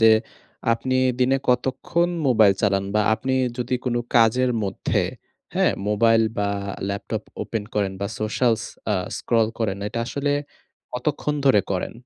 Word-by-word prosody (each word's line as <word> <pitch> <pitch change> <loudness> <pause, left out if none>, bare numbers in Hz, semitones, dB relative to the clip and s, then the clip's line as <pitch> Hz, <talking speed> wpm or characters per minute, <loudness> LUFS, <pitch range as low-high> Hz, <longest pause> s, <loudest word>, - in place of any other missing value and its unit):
যে 115 0 +7 0.6
আপনি 130 +3 0 0.2
দিনে 130 +2 +4
কতক্ষণ 130 +7 +1 0.2
মোবাইল 110 -5 +6
চালান 100 -1 +2
বা 105 - +4
আপনি 130 +3 -2 0.2
যদি 125 +1 -1
কোন 125 - 0 0.2
কাজের 120 +2 +4
মধ্যে, 95 - -1 0.5
হ্যাঁ? - - +3 0.2
মোবাইল 115 +2 +4 0.2
বা 100 0 +1 0.4
ল্যাপটপ 100 0 -3 0.2
ওপেন 110 -2 -3
করেন 100 -2 0
বা 100 - 0
সোশ্যাল 115 +2 +2 0.4
আ - - +2 0.2
স্ক্রল 115 -2 +2
করেন 100 -4 -1
এটা 115 - -4
আসলে 145 +2 -1 0.6
কতক্ষণ 145 +3 -1
ধরে 105 -6 +6
করেন? 90 - -2
115 Hz, 140 wpm, -23 LUFS, 105-130 Hz, 0.6 s, যে